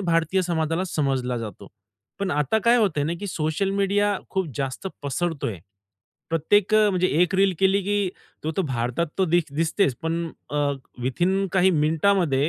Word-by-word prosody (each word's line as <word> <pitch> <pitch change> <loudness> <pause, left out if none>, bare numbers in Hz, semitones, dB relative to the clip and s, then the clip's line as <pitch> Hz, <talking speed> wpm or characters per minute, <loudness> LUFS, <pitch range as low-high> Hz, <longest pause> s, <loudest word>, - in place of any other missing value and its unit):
भारतीय 170 +1 +1
समाजाला 165 0 -1
समजला 135 -7 -1
जातो. 110 -4 -8 0.5
पण 200 -2 -1
आता 150 +8 +1
काय 235 +1 +6
होतंय 190 -10 +1
ना, 160 - -1
की 205 - -4
सोशल 160 +2 -1
मीडिया 200 +1 +1
खूप 190 -2 -1
जास्त 135 +5 -3 0.2
पसरतोय. 140 - -2 0.7
प्रत्येक 185 +6 +2
अ, 215 -1 +5
म्हणजे 185 -1 +2 0.2
एक 180 - 0
रील 195 0 +4
केली 195 +1 +3
की 205 0 0 0.4
तो 160 - -1
तर 195 - +2
भारतात 125 +5 -1
तो 190 - +4
दिस 175 +1 +3
दिसतेच 165 -2 +1
पण 165 +1 -1 0.2
अ, 150 - -3 0.5
विथिन 180 +10 +1
काही 190 0 +4
मिनिटामध्ये 155 -2 +2
170 Hz, 160 wpm, -24 LUFS, 150-195 Hz, 0.7 s, काय